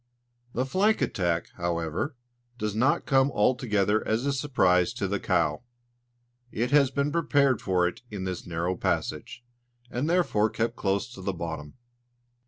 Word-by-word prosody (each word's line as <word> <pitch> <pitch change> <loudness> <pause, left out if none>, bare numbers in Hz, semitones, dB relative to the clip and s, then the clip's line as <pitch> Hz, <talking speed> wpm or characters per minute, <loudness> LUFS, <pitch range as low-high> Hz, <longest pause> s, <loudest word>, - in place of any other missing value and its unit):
The 125 - 0
flank 200 +10 +2
attack, 85 -3 -1
however, 85 - -2 0.4
does 105 -3 -2
not 125 +6 +2
come 135 -1 +4
altogether 105 -3 +2
as 110 +4 0
a 140 - +1
surprise 115 -9 +2
to 105 -5 -2
the 100 +1 -1
"cow"; 85 -8 +1 0.9
it 120 +4 -1
has 145 -2 +5
been 140 +2 -1
prepared 145 -7 +2
for 90 -2 +2
it 90 - -6
in 100 -3 -5
this 95 -2 -4
narrow 85 +2 -1
passage, 120 - -2 0.5
and 130 +6 -1
therefore 165 -12 +2
kept 110 +2 -2
close 100 +4 0
to 95 - -10
the 95 +1 -2
bottom. 80 -4 -6
105 Hz, 150 wpm, -27 LUFS, 90-135 Hz, 0.9 s, has